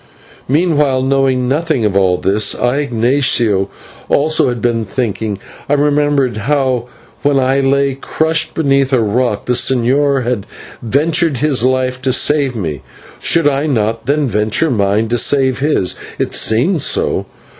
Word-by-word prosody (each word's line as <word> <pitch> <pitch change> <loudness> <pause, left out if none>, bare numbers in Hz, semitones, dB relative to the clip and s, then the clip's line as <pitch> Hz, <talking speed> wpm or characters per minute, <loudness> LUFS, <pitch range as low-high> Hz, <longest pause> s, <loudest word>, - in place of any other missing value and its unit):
Meanwhile, 145 -3 +1
knowing 135 -2 +1
nothing 150 -3 0
of 100 -2 -1
all 95 -2 +2
this, 100 +4 +1
I, 125 +2 0
Ignatio, 120 -6 +1 0.4
also 155 -1 +2
had 120 -1 -3
been 115 0 -1
thinking. 110 -1 -3 0.3
I - - +2
remembered 145 -4 +1
how, 130 0 0 0.4
when 145 -1 +1
I 135 +1 +1
lay 140 0 +1
crushed 160 0 -1
beneath 140 -4 +1
the 130 -2 +2
rock, 110 0 -1
the 125 - 0
señor 135 +3 +1
had 120 -4 -3 0.3
ventured 150 +5 +1
his 135 -2 +1
life 130 0 0
to 130 0 0
save 140 -1 +1
me. 80 - -4 0.4
Should 165 -3 +2
I 145 +1 0
not 115 -3 -1
then 145 0 +1
venture 110 +7 0
mine 105 0 0
to 120 0 +1
save 135 -1 +2
his? 140 -10 0 0.2
It - - -3
seemed 145 - +1
so. - - 0
130 Hz, 145 wpm, -14 LUFS, 115-145 Hz, 0.4 s, all